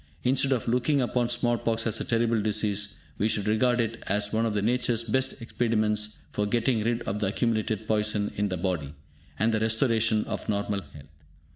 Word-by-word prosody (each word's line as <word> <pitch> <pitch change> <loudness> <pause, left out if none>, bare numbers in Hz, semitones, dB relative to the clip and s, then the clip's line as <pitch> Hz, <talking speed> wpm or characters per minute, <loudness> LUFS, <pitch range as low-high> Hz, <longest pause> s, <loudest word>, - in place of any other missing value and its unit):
Instead 135 +2 +2
of 125 -4 0
looking 125 +5 +2
upon 120 -1 0
small 120 -1 +1
pox 115 -1 0
as 110 - 0
a - - 0
terrible 115 -1 +1
disease, 105 -1 0 0.2
we 105 - +2
should 105 -2 0
regard 120 +3 +2
it 115 0 -1
as 105 +1 0
one 115 +1 +2
of 105 - -2
Nature's 115 +2 +1
best 130 +4 0
expedients 110 -3 0
for 105 0 -1
getting 115 0 +1
rid 120 +1 0
of 105 - -3
the 105 - 0
accumulated 110 0 -1
poison 105 -1 0
in 105 0 0
the 90 - -2
body, 85 -6 -2 0.4
and 110 +2 +2
the 110 - +2
restoration 110 -1 +2
of - - -5
normal 100 -1 -1
health. 75 -3 -14
110 Hz, 185 wpm, -27 LUFS, 105-120 Hz, 0.4 s, Instead